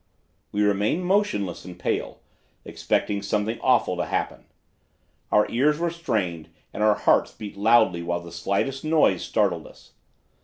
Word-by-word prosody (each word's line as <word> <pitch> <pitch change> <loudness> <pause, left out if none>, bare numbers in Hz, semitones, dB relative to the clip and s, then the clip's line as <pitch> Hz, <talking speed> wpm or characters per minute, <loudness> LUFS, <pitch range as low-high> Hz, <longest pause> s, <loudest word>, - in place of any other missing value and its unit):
"We 105 0 +1
remained 105 - +1
motionless 180 - 0
and 90 -1 -10
pale, - - -3 0.4
expecting 100 -1 -1
something 105 +3 -2
awful 125 -8 +2
to - - -1
happen. - - -3 0.9
Our 105 - +4
ears 145 +5 +2
were 170 +1 -1
strained 105 - -3 0.2
and - - -5
our 105 -1 +4
hearts - - +2
beat 105 -2 -9
loudly 100 -4 +3
while 85 0 -2
the 85 -1 -11
slightest 100 +10 -2
noise 155 - +3
startled 90 -7 0
us. - - -18
105 Hz, 145 wpm, -24 LUFS, 90-130 Hz, 0.9 s, Our